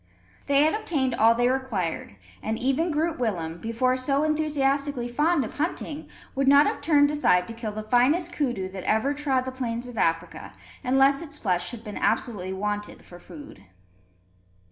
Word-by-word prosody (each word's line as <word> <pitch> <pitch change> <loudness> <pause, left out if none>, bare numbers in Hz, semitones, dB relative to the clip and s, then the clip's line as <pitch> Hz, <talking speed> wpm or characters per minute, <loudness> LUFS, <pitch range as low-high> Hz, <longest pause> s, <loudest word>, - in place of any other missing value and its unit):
They 280 0 +4
had 310 - +3
obtained 295 - -1
all 230 0 +4
they 245 +1 +2
required; 230 - -2 0.3
and 220 +1 -2
even 270 +8 0
Groot 320 0 -1
Willem, 175 -8 -2
before 230 +4 0
so 275 +3 0
enthusiastically 285 -4 0
fond 295 +3 +1
of 220 - -10
hunting, 315 -1 -3 0.2
would 270 0 0
not 280 +1 +7
have - - -2
turned 290 -1 +4
aside 180 -12 +2
to - - -5
kill 225 -2 -5
the 215 +1 -5
finest 270 +10 +2
koodoo 245 - -1
that 190 -1 -7
ever 220 +7 +1
trod 275 -3 0
the 260 - -4
plains 245 -2 -4
of 240 -4 -7
Africa, 165 0 -1 0.3
unless 270 +3 +3
its 295 -3 -7
flesh 180 -6 -1
had 230 -2 -9
been 210 -3 -7
absolutely 210 -5 -1
wanted 205 +2 -4
for 175 - -13
food. 150 - -13
255 Hz, 170 wpm, -25 LUFS, 215-285 Hz, 0.3 s, not